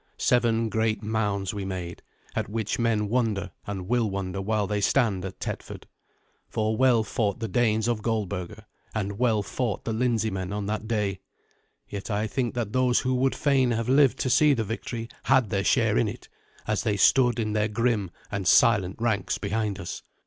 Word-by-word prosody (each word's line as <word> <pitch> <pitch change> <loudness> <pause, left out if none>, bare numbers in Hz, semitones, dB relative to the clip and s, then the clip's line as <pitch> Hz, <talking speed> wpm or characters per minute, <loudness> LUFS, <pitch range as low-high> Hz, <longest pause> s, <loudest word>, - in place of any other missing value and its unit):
Seven 115 -2 +2
great 110 +1 0
mounds 105 -3 -1
we 100 -1 -4
made, 90 -3 -5 0.3
at - - -2
which 110 0 -2
men 110 -3 +1
wonder 105 -5 0 0.2
and 95 -3 -5
will 120 -1 +1
wonder 95 -1 -3
while 105 +1 0
they 105 +1 -1
stand 105 -5 +2
at 95 - -7
Tetford. - - -6 0.6
For 110 0 0
well 120 -2 +4
fought 105 -2 -1
the 115 - -2
Danes 110 +1 +1
of 115 -3 0
Goldberga, 105 -2 -3 0.3
and 100 -1 -3
well 115 -4 +2
fought 110 +1 -3
the 115 - -1
Lindseymen 110 -5 0
on 105 0 -3
that 110 +1 -3
day. 105 -4 -1 0.7
Yet 100 +1 -6
I 105 0 0
think 120 +2 -2
that 115 -3 -3
those 130 -1 +3
who 130 0 0
would 130 +1 +1
fain 135 -3 +2
have 115 -1 -1
lived 135 -1 +5
to 130 - 0
see 150 +1 +5
the 115 - -1
victory 115 +2 -5 0.2
had 130 -5 +3
their 100 -2 0
share - - +3
in - - +2
it, - - -7 0.4
as 105 -1 0
they 105 -3 0
stood 120 +3 +4
in 110 -2 -1
their 105 0 +1
grim 110 -3 0 0.2
and 100 -3 -2
silent 95 -3 +4
ranks 110 -5 0
behind 105 -1 -2
us. 85 - -6
110 Hz, 185 wpm, -26 LUFS, 100-120 Hz, 0.7 s, lived